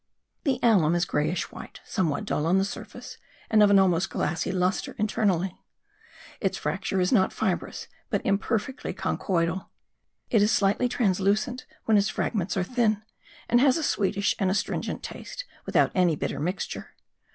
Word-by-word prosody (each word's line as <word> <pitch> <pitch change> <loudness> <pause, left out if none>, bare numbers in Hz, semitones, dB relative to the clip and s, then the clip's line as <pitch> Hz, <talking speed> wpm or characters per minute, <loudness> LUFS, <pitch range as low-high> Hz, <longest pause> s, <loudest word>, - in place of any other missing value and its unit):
The 270 -3 +2
alum 180 -9 +4
is 175 0 +2
greyish 155 +2 -1
white, - - -10
somewhat 165 -8 -1
dull 150 - -1
on 180 +3 +4
the 195 - +2
surface - - -8 0.3
and 215 -1 +5
of 205 - +7
an 200 - +6
almost 185 -1 +3
glassy 175 +1 -1
lustre 185 0 -1
internally. 195 -4 0 0.8
Its - - -1
fracture 195 - -2
is 180 0 +1
not 190 -6 +4
fibrous 190 -5 -2 0.2
but - - -1
imperfectly 215 +6 -1
conchoidal. 180 0 -1 0.6
It 220 - +4
is 210 +2 +4
slightly 210 +6 +2
translucent 210 +2 0 0.2
when 220 -2 +4
its 200 0 +1
fragments 200 -2 -1
are 185 - +2
thin; 220 -1 +1 0.4
and 240 +1 +4
has 270 0 +5
a 320 - -2
sweetish 200 -5 +1
and 190 - +2
astringent 195 - -2
taste - - -7 0.2
without - - +3
any 180 -4 +3
bitter - - -3
mixture. 180 +6 -4
195 Hz, 155 wpm, -26 LUFS, 180-220 Hz, 0.8 s, of